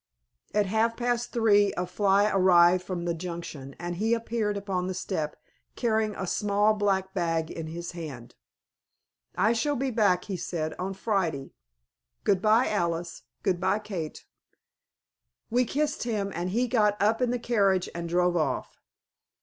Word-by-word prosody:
At 210 -1 +3
half 220 +3 +1
past 240 0 -1
three 205 -3 +4
a 180 - 0
fly 200 +2 +3
arrived 180 -2 +5
from 180 -2 -4
the 170 - 0
Junction, 165 -5 -7
and 175 0 -5
he 225 +4 +2
appeared 225 -3 -2
upon 190 -2 -2
the 185 - -3
step 160 -5 -3 0.4
carrying 220 -3 0
a 190 - -3
small 205 +3 +2
black 195 -2 0
bag 165 -1 -1
in 165 -1 -5
his 170 +2 -6
hand. 140 -9 -8 1.0
"I 225 - +3
shall 290 +5 0
be 265 0 -1
back," 200 -6 +2
he 195 -3 -4
said, 160 -2 -3
"on 190 +2 -3
Friday. 185 -9 -1 0.7
Goodbye, 215 +5 +3
Alice; 170 -4 -2 0.2
goodbye, 185 +2 +1
Kate." 190 -7 -6 1.3
We 250 +2 +3
kissed 295 +4 -1
him, 210 -4 -2
and 175 +2 -2
he 240 +6 +1
got 210 -4 +2
up 220 +4 +2
in 250 - +2
the 245 - 0
carriage 200 -6 +2
and 170 0 -5
drove 175 +1 +2
off. 150 -6 -2
195 Hz, 150 wpm, -27 LUFS, 175-220 Hz, 1.3 s, arrived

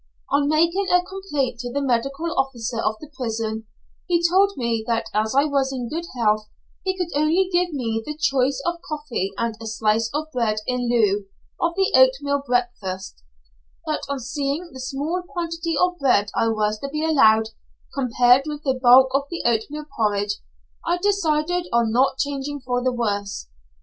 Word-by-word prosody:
On 285 0 +2
making 335 +5 +2
a 360 0 +4
complaint 295 -11 -3
to 245 0 -5
the 280 - -1
medical 275 +5 -1
officer 250 -3 -1
of 215 - 0
the 305 -1 -12
prison, 225 -3 -3 0.4
he 340 -1 +3
told 385 +3 +4
me 235 -3 -1
that 230 -1 0
as 215 +3 0
I 280 - +5
was 280 -3 +1
in 250 -3 -4
good 335 +2 -4
health 215 -2 +1 0.3
he 380 0 -1
could 355 -4 -3
only 320 +6 +3
give 355 0 +2
me 230 -6 -2
the 300 +3 -6
choice 275 -3 +1
of 345 0 -2
coffee 295 -11 -3
and 230 -1 -1
a 225 - -6
slice 220 0 +1
of 310 +2 -3
bread 230 -4 +1
in 250 -1 -1
lieu 210 -4 +2 0.3
of 340 0 0
the 385 0 +2
oatmeal 270 +2 +4
breakfast; 205 - -2 0.6
but - - -1
on 280 - -1
seeing 280 +6 -3
the 260 - -9
small 285 +7 -2
quantity 335 -2 -3
of 360 0 +1
bread 210 -7 +3
I 225 - +1
was 215 -1 0
to 275 - -5
be 305 +2 -2
allowed, 220 -8 +4 0.4
compared 250 +1 +3
with 300 0 -5
the 265 - +2
bulk 255 +1 +7
of 280 +1 +1
the 340 - -4
oatmeal 240 +6 0
porridge, 205 -2 0 0.5
I 345 +1 +1
decided 355 -3 +1
on 235 -1 +2
not 260 +3 +2
changing 285 0 -3
for 245 -1 -1
the 255 - +2
worse. 205 -4 -3
270 Hz, 175 wpm, -23 LUFS, 230-310 Hz, 0.6 s, bulk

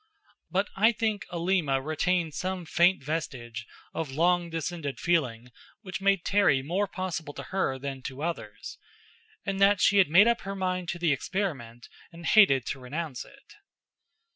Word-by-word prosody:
But 195 +2 0
I 220 +4 +4
think 220 -3 -2
Alima 170 -5 +1
retained 160 +3 0
some 185 +1 -3
faint 175 -1 +3
vestige 125 -7 -4 0.3
of 160 -3 -3
long 170 +4 +2
descended 165 -3 -4
feeling 125 -9 0 0.3
which 190 -1 -6
made 195 -2 +2
Terry 160 -10 +3
more 185 +8 0
possible 175 -6 -5
to - - -6
her 160 -9 0
than 135 0 -6
to 135 +3 -8
others; 110 -11 -5 0.7
and 195 0 -2
that 200 0 +5
she 200 - +4
had 190 - +5
made 190 +8 +7
up 235 0 +2
her 195 0 -5
mind 185 -2 -2
to 175 - -2
the 170 -4 +2
experiment 135 - -4 0.2
and 170 0 -11
hated 160 - +5
to 135 - -4
renounce 135 +1 -5
it. 275 - -19
170 Hz, 160 wpm, -28 LUFS, 140-190 Hz, 0.7 s, made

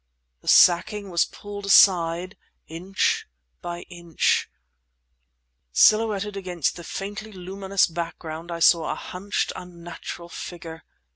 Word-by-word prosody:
The - - -20
sacking 200 +3 +4
was 170 - +3
pulled 205 -1 -9
aside 180 -1 +4 0.3
inch 180 +4 -1 0.3
by 175 0 -6
inch. 170 -2 -1 1.2
Silhouetted 210 - +3
against 180 -5 -2
the 170 - -9
faintly 205 +5 -6
luminous 190 +1 0
background 165 0 -6
I 170 0 -5
saw 165 -1 +4
a - - -1
hunched, 195 +3 -3
unnatural 175 -1 -9
figure. 165 -2 -8
180 Hz, 110 wpm, -24 LUFS, 170-195 Hz, 1.2 s, sacking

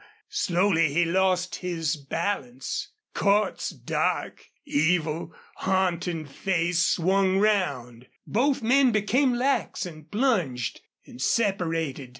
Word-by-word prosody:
Slowly 170 -3 +2
he 170 +4 +2
lost 185 +1 +1
his 165 -5 -2
balance. 145 - -3 0.3
Cordts's 200 0 +1
dark, - - -2 0.2
evil, 160 +1 0 0.3
haunting 180 -3 0
face 170 +3 0
swung 190 +2 +2
round. 140 - 0 0.2
Both 265 +3 +1
men 260 +2 +4
became 240 +5 +2
lax 255 -4 0
and 155 -3 -10
plunged, 180 - 0 0.2
and 125 - -11
separated. 165 - 0
180 Hz, 100 wpm, -26 LUFS, 155-205 Hz, 0.3 s, men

